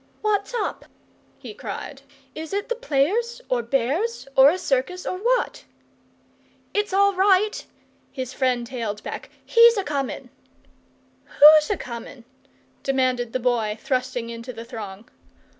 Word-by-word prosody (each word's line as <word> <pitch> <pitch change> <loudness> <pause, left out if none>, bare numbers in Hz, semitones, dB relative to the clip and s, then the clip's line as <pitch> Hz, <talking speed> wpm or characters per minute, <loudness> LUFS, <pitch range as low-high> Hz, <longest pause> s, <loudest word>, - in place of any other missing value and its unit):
"What's 410 -1 0
up?" 445 - -3 0.5
he - - -9
cried. 295 - -7 0.3
"Is 320 +3 -7
it 405 +3 -2
the 485 - 0
players, 465 - 0
or 250 -2 +1
bears, 275 - -1
or 265 +1 +8
a 350 - 0
circus, 360 +4 -1
or 365 - -3
what?" - - 0 1.1
"It's 415 0 0
all 400 +1 +4
right," 390 +2 +2 0.5
his 260 -2 -5
friend 250 -3 0
hailed 230 -5 -5
back. - - -7 0.2
"He's 465 -1 +6
a 400 - 0
coming." 280 -5 -4 0.9
"WHO'S 305 +1 +7
a 410 - 0
coming?" 235 0 -8 0.6
demanded 255 -3 0
the 255 - -1
Boy, 230 -4 0
thrusting 255 -2 -2
into 230 +2 -7
the 230 -1 -9
throng. 220 -3 -8
275 Hz, 135 wpm, -23 LUFS, 245-400 Hz, 1.1 s, or